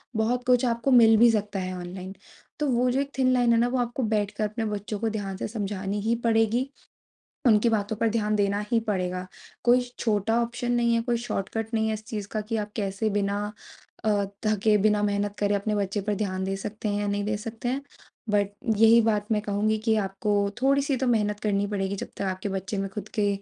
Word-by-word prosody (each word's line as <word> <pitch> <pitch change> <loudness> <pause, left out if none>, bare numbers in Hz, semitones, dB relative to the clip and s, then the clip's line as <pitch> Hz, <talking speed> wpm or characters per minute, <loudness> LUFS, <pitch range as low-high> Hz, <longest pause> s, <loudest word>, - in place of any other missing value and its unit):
बहुत 235 +3 +1
कुछ 250 0 +4
आपको 235 +2 0
मिल 230 -3 +7
भी 235 +2 +7
सकता 210 -2 -1
है 185 0 -3
ऑनलाइन। 185 +2 -7 0.4
तो 300 - +1
वो 245 +1 +2
जो 265 - +1
एक 280 0 -4
थिन 255 -1 +3
लाइन 245 -2 +4
है 230 - +4
ना 240 - +3
वो 255 +1 -1
आपको 245 +2 -1
बैठकर 205 +1 -1
अपने 220 +2 -3
बच्चों 210 0 -4
को 225 - 0
ध्यान 200 -3 -4
से - - -3
समझानी 205 -2 -3
ही 225 +3 +1
पड़ेगी। 230 +3 +2 0.8
उनकी 220 +1 +5
बातों 220 -1 0
पर 230 - +2
ध्यान 215 -1 0
देना 200 0 +1
ही 230 - +4
पड़ेगा। 185 -2 -2 0.4
कोई 245 +1 +5 0.2
छोटा 225 +1 +1
ऑप्शन 240 +1 -3
नहीं 235 -1 +2
है 230 - +2
कोई 240 0 0
शॉर्टकट 225 0 -4
नहीं 220 0 +1
है 220 - 0
इस 215 0 -6
चीज़ 210 -3 -5
का 215 - -1
कि 220 +2 -4
आप 210 -1 -3
कैसे 200 +1 -1
बिना 205 +1 -1 0.5
अ, 205 -2 +2 0.2
थके 215 0 +3
बिना 210 +1 +2
मेहनत 205 0 0
करे 205 0 +2
अपने 210 +1 -1
बच्चे 200 0 -1
पर 210 +2 -1
ध्यान 190 -2 -2
दे 195 +1 -1
सकते 210 +2 -5
हैं 205 0 -1
या 205 - -1
नहीं 205 0 -1
दे 210 0 0
सकते 225 +2 -6
हैं। 265 +2 -1 0.5
बट 205 -1 +2 0.3
यही 225 +1 +7
बात 210 -2 +1
मैं 210 -1 +2
कहूँगी 210 +1 0
कि 220 - +3
आपको 195 +2 -2 0.3
थोड़ी 275 +1 +4
सी 275 0 0
तो 260 - -1
मेहनत 210 -3 +1
करनी 205 -1 0
पड़ेगी 200 -1 -2
जब - - -5
तक - - -5
आपके 190 +1 -3
बच्चे 195 +1 -3
में 195 0 -2
खुद 210 +2 -6
के 210 -2 +2
210 Hz, 225 wpm, -26 LUFS, 200-230 Hz, 0.8 s, मिल